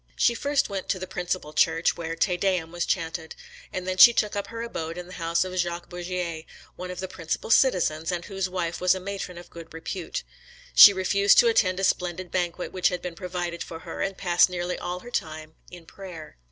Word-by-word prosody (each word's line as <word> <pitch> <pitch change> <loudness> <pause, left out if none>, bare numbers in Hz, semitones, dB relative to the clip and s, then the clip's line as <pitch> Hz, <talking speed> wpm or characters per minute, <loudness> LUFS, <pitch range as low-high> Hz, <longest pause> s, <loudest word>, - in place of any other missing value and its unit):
She 240 - +3
first 285 +4 0
went 195 -2 -5
to - - +1
the 185 - -5
principal 180 -4 -4
church, 165 +1 +2
where 165 -1 -5
TE 180 +2 +1
DEUM 180 -3 0
was 175 0 -3
chaunted; 165 -2 -3 0.4
and 185 0 -5
then 185 0 -2
she 235 +5 +10
took 210 -2 0
up 200 - -3
her 230 0 -6
abode 165 -8 -5
in 180 - -6
the 180 - -12
house 165 +1 +1
of 185 0 -6
Jacques 175 -1 -2
Bourgier, 175 -2 -4 0.3
one 180 - -7
of 180 - -6
the 190 - -3
principal 170 +4 -4
citizens, 175 - +3
and 175 -1 -3
whose 195 -2 -3
wife 175 -2 -3
was 180 +1 +4
a - - -4
matron 190 -2 -6
of 175 - -12
good 165 -1 -11
repute. 170 +2 -5 0.5
She 205 - +11
refused 200 +1 +3
to 235 - +7
attend 185 -5 +2
a - - -2
splendid 180 -1 -1
banquet 180 -1 -2
which 180 -1 +1
had 180 -2 -5
been 180 -1 -4
provided 175 -1 -5
for 165 0 -7
her, - - -7
and 195 -1 -2
passed 175 -1 +4
nearly 180 0 -3
all 180 +1 -4
her 245 - -11
time 155 -5 -4 0.2
in 175 -2 -12
prayer. 175 -4 -10
180 Hz, 220 wpm, -26 LUFS, 170-190 Hz, 0.5 s, She